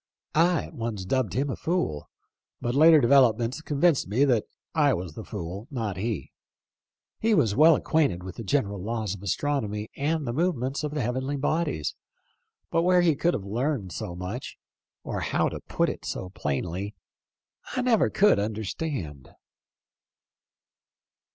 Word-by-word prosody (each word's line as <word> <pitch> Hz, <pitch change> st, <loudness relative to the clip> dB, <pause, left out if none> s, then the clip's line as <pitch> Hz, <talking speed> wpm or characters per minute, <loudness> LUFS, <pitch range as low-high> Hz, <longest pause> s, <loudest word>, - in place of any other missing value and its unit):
I 170 Hz, 0 st, +3 dB
at -, -, -10 dB
once 115 Hz, -5 st, -4 dB
dubbed 125 Hz, -3 st, 0 dB
him 135 Hz, +4 st, 0 dB
a -, -, -3 dB
fool, 160 Hz, -, -2 dB, 0.5 s
but 120 Hz, -, -2 dB
later 155 Hz, +3 st, +7 dB
developments 125 Hz, 0 st, +4 dB
convinced 150 Hz, -, +2 dB
me 120 Hz, +9 st, +3 dB
that 120 Hz, -6 st, +2 dB, 0.3 s
I 145 Hz, -5 st, +3 dB
was 90 Hz, -3 st, -5 dB
the 110 Hz, -, -7 dB
fool, 100 Hz, +2 st, -6 dB
not 110 Hz, -8 st, -3 dB
he. 110 Hz, 0 st, -3 dB, 0.9 s
He 220 Hz, 0 st, +3 dB
was 105 Hz, -, +2 dB
well 155 Hz, +3 st, +7 dB
acquainted 145 Hz, -, +1 dB
with 95 Hz, -1 st, -8 dB
the 115 Hz, -, -5 dB
general 100 Hz, -5 st, 0 dB
laws 110 Hz, -1 st, -2 dB
of 100 Hz, -, -9 dB
astronomy 105 Hz, -, -1 dB
and 155 Hz, +1 st, -1 dB
the 120 Hz, -, -2 dB
movements 145 Hz, -3 st, -1 dB
of 150 Hz, 0 st, -3 dB
the 150 Hz, -, 0 dB
heavenly 130 Hz, +4 st, -2 dB
bodies, 145 Hz, -, -1 dB, 0.8 s
but 165 Hz, -, +3 dB
where 180 Hz, +1 st, +4 dB
he 165 Hz, -4 st, +3 dB
could 175 Hz, +5 st, +1 dB
have 95 Hz, -, -5 dB
learned 115 Hz, -, -2 dB
so 85 Hz, +1 st, -5 dB
much, 90 Hz, +8 st, -6 dB, 0.5 s
or -, -, -3 dB
how -, -, +1 dB
to -, -, -6 dB
put -, -, 0 dB
it -, -, -4 dB
so 90 Hz, -, -5 dB
plainly, 90 Hz, +6 st, -3 dB, 0.8 s
I 255 Hz, -, 0 dB
never 240 Hz, -4 st, +3 dB
could 205 Hz, -, +4 dB
understand." 100 Hz, -, -4 dB
125 Hz, 155 wpm, -26 LUFS, 100-150 Hz, 0.9 s, later